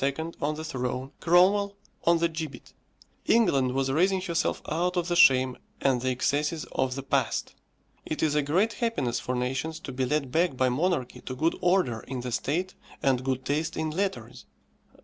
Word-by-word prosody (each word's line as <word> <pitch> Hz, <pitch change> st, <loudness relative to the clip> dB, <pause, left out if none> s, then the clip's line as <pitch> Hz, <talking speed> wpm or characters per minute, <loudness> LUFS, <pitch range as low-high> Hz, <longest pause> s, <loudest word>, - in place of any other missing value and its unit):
on 150 Hz, +2 st, 0 dB
the 155 Hz, -, -6 dB
throne, 130 Hz, -2 st, -3 dB
Cromwell 195 Hz, +4 st, +4 dB, 0.3 s
on 170 Hz, 0 st, +5 dB
the 170 Hz, +1 st, +2 dB
gibbet. 160 Hz, -6 st, -7 dB, 0.5 s
England 135 Hz, -, +3 dB
was 135 Hz, 0 st, 0 dB
raising 185 Hz, +6 st, +3 dB
herself 170 Hz, -3 st, -1 dB
out 180 Hz, +3 st, 0 dB
of 175 Hz, 0 st, 0 dB
the 175 Hz, -, +1 dB
shame 130 Hz, -5 st, +5 dB, 0.2 s
and 130 Hz, -3 st, +2 dB
the 130 Hz, -, 0 dB
excesses 145 Hz, +5 st, 0 dB
of 130 Hz, -1 st, -1 dB
the 135 Hz, -, -5 dB
past. -, -, -1 dB, 0.5 s
It 155 Hz, -, -3 dB
is 155 Hz, -2 st, +2 dB
a 150 Hz, -, +3 dB
great 185 Hz, +11 st, +1 dB
happiness 180 Hz, -, -1 dB
for 125 Hz, -, -3 dB
nations 135 Hz, +6 st, -2 dB
to 135 Hz, -, -7 dB
be 130 Hz, 0 st, -1 dB
led 140 Hz, -1 st, -1 dB
back 165 Hz, -3 st, +1 dB
by 130 Hz, 0 st, +3 dB
monarchy 135 Hz, -1 st, -1 dB
to 130 Hz, -, -6 dB
good 160 Hz, +6 st, +1 dB
order 175 Hz, -11 st, +2 dB
in 125 Hz, +2 st, -6 dB
the 125 Hz, 0 st, -5 dB
state 170 Hz, +10 st, -1 dB, 0.3 s
and 130 Hz, -2 st, +2 dB
good 130 Hz, 0 st, -2 dB
taste 155 Hz, +4 st, -1 dB
in 160 Hz, 0 st, -1 dB
letters. 195 Hz, +4 st, -3 dB
150 Hz, 180 wpm, -27 LUFS, 130-175 Hz, 0.5 s, on